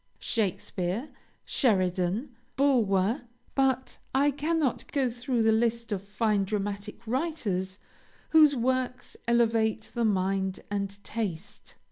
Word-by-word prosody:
Shakespeare, 195 - -2 0.4
Sheridan, 190 - +1 0.2
Bulwer, 235 -4 +2 0.3
but 265 -1 +1 0.2
I 285 +2 +4
cannot 300 0 -1
go 270 -4 +1
through 240 0 -1
the 220 - +5
list 230 +1 +1
of 200 -3 -1
fine 205 0 +1
dramatic 205 +2 -4
writers 220 - -2 0.5
whose 305 -3 +7
works 255 +1 -1
elevate 225 -2 +2
the 235 - 0
mind 190 -2 0
and 200 0 -3
taste. 205 -3 -5
225 Hz, 105 wpm, -28 LUFS, 200-255 Hz, 0.5 s, whose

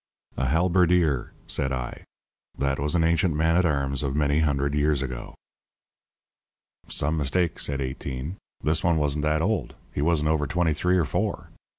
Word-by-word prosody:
"A 65 - -1
halberdier," 85 -2 +2
said 65 - 0
I. 65 -2 -4 0.5
"That 70 0 0
was 75 +3 0
an 85 - +3
ancient 85 0 +2
man 80 +2 +2
at 90 0 +4
arms 70 -3 0
of 70 -2 -2
many 75 0 +2
hundred 70 -2 +1
years 75 -1 +1
ago." 65 -2 -6 1.5
"Some 75 +3 0
mistake," 80 +4 0
said 70 -1 -2
Eighteen. 65 +5 -5 0.3
"This 80 +1 +1
one 85 -2 +3
wasn't 75 -1 +1
that 75 +1 +1
old. 110 +4 -1 0.2
He - - -2
wasn't 75 -1 +2
over 75 -2 +1
twenty 85 +1 +1
three 90 +5 +1
or 85 - +2
four. 65 - -2
75 Hz, 165 wpm, -25 LUFS, 70-85 Hz, 1.5 s, at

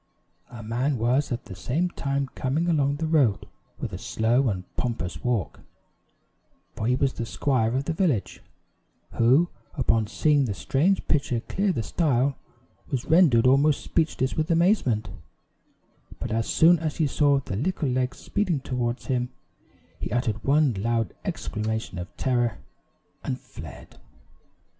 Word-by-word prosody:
A 115 -2 -9
man 125 +5 0
was 125 +6 +1
at 120 +1 -3
the - - -9
same 150 - -1
time 140 -2 -2
coming 150 +6 -1
along 145 -4 +2
the 160 +2 -3
road 145 -10 +2 0.3
with - - -5
a - - -5
slow 120 +4 +1
and 95 -3 -3
pompous 115 -8 -3
walk 120 -8 -1 1.2
for 110 - -2
he 125 - +3
was 135 0 +1
the 115 - -4
squire 125 -4 0
of 135 +1 -1
the 165 - -1
village 155 - 0 0.7
who, 135 +9 +4 0.3
upon 115 -6 +1
seeing 145 +4 +2
the 105 -5 -3
strange 165 - +1
pitcher 130 -5 +1
clear 195 - 0
the 115 - -2
stile, 140 -2 +1 0.5
was 130 -4 -2
rendered 155 -9 +5
almost 140 +3 +4
speechless 155 -5 0
with 155 0 -1
amazement; 165 - +2 1.1
but - - -4
as 115 0 0
soon 170 +1 +5
as 155 -2 -2
he 160 - +2
saw 140 0 +3
the 115 - -5
little 155 - -1
legs 130 0 -1
speeding 180 -8 -1
toward 125 -2 -2
him, 125 -1 -1 0.7
he - - -4
uttered 115 -3 -1
one 145 -1 +3
loud 115 -3 0
exclamation 110 -3 -3
of 90 - -5
terror, 120 -5 0 0.7
and - - -3
fled! - - -12
130 Hz, 150 wpm, -25 LUFS, 115-150 Hz, 1.2 s, rendered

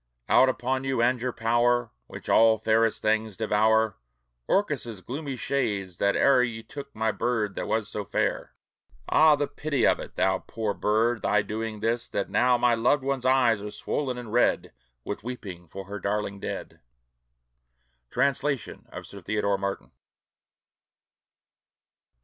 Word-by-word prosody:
Out 130 - +5
upon 130 +1 -1
you, 135 -2 -1
and 120 +1 +2
your 125 0 -1
power, 120 +1 +1 0.2
Which - - -10
all 115 0 +5
fairest 110 +1 +1
things 110 -1 0
devour, 110 0 +2 0.5
Orcus's 130 - 0
gloomy 140 - -5
shades, 100 -9 -2
that 100 0 +2
e'er 135 -2 +5
Ye 115 -2 -2
took 140 0 -10
my 110 0 +1
bird 110 -3 -1
that - - -4
was 110 -2 0
so 105 - -4
fair! - - -2 0.5
Ah, 155 -1 +6
the 145 0 0
pity 145 -5 -1
of - - +3
it! - - -9
Thou 95 0 +2
Poor 110 -3 -3
bird, 115 +3 +1
thy 105 -1 +2
doing 110 0 -5
'tis, 120 +2 -1
that 100 - -3
now 125 0 +3
My 120 0 +3
loved 120 +5 +2
one's 135 -2 -2
eyes 125 -5 +3
are 105 - -5
swollen 125 +5 -3
and 120 -3 -8
red, 120 - +2 0.3
With 100 - -5
weeping 95 -8 -7
for 95 +4 -8
her 100 +2 -6
darling 100 0 -2
dead. - - -6 1.3
Translation 140 -1 -1
of - - -8
Sir 100 - -11
Theodore 100 +1 0
Martin. 100 -11 -4
115 Hz, 150 wpm, -26 LUFS, 105-125 Hz, 1.3 s, Ah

